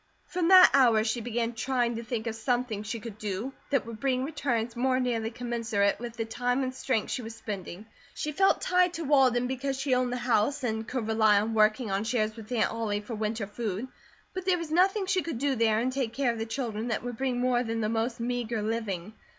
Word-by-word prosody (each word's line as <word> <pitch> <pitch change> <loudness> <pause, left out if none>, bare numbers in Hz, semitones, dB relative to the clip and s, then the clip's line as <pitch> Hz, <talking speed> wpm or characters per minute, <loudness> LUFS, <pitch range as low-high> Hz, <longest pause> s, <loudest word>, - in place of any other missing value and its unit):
From 350 -2 -1
that 370 0 +9
hour 240 -5 +5
she 230 +2 -1
began 235 0 -2
trying 240 0 0
to 230 - -5
think 225 -1 -3
of 225 - -2
something 240 -2 -1
she 220 +2 -4
could 215 -1 -9
do 210 +5 -3 0.2
that 275 -5 +1
would 225 -1 -8
bring 255 0 0
returns 245 -6 -2
more 255 +1 +1
nearly 235 -3 -1
commensurate 225 -4 -1
with 235 -1 -7
the 225 - -1
time 245 +3 -1
and 255 0 -2
strength 255 -4 -1
she - - -2
was 225 -1 -8
spending. 200 -2 -7 0.3
She 300 - -3
felt 385 +6 +3
tied 360 -1 +3
to 330 - -4
Walden 265 -4 +4
because 265 +1 -2
she 270 -1 0
owned 250 -1 +1
the 250 - -1
house, 245 +3 +1
and 220 -2 -2
could 250 -4 -3
rely 220 -2 +4
on 220 +2 -1
working 215 +1 +2
on 195 +1 0
shares 220 -2 0
with 225 0 -11
Aunt 240 - +1
Ollie 210 -2 -2
for 210 +3 -7
winter 215 0 -2
food; 210 +2 -4 0.4
but 370 - -4
there 370 -1 +3
was 335 -3 -6
nothing 385 +4 +3
she 375 0 +1
could 330 -7 -4
do 280 +2 +1
there 225 -3 +2
and 250 +3 0
take 255 -4 -2
care 260 -3 +1
of 230 - -7
the 225 - -3
children 225 -2 -3
that 230 - -2
would 245 -2 -5
bring 255 -1 -1
more 250 -1 +2
than 225 -1 -2
the 215 - 0
most 230 +2 -1
meagre 235 -2 -2
living. 215 -4 -3
235 Hz, 230 wpm, -28 LUFS, 220-260 Hz, 0.4 s, that